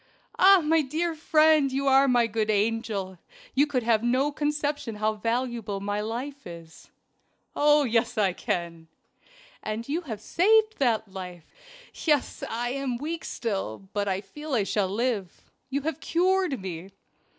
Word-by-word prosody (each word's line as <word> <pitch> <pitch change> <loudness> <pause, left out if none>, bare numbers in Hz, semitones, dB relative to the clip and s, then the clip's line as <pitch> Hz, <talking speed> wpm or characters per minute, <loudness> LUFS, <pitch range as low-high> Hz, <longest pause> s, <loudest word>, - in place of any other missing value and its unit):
"Ah! 385 0 +7
my 320 +1 +3
dear 320 +4 -2
friend, 310 -2 +3
you 275 +1 -1
are 270 0 +5
my 245 -2 +4
good 220 -1 -2
angel 210 -3 -1 0.3
you 285 +3 +3
can 260 -4 -1
have 225 -2 +2
no 255 +5 +1
conception 295 -4 -2
how 215 +1 0
valuable 230 -2 -2
my 205 +1 -2
life 255 +5 -5
is." 165 -2 -12 0.7
"Oh, 295 0 +4
yes, 235 -1 0
I 195 -4 +2
can!" 170 -2 -4 0.7
"And 215 +2 -4
you 310 +5 -1
have 230 - -6
saved 435 - +2
that 220 -6 0
life. 180 -4 -8 0.5
Yes! 295 -5 0
I 240 +2 -2
am 265 -2 -2
weak 320 +5 -4
still, 195 - -4
but 205 -1 -1
I 190 0 -1
feel 295 +8 -6
I 215 - +2
shall 195 -1 0
live. 210 -3 -3 0.2
You 280 +1 -1
have 320 -1 -3
cured 365 -3 +1
me." 185 -1 -7
240 Hz, 150 wpm, -26 LUFS, 205-295 Hz, 0.7 s, Ah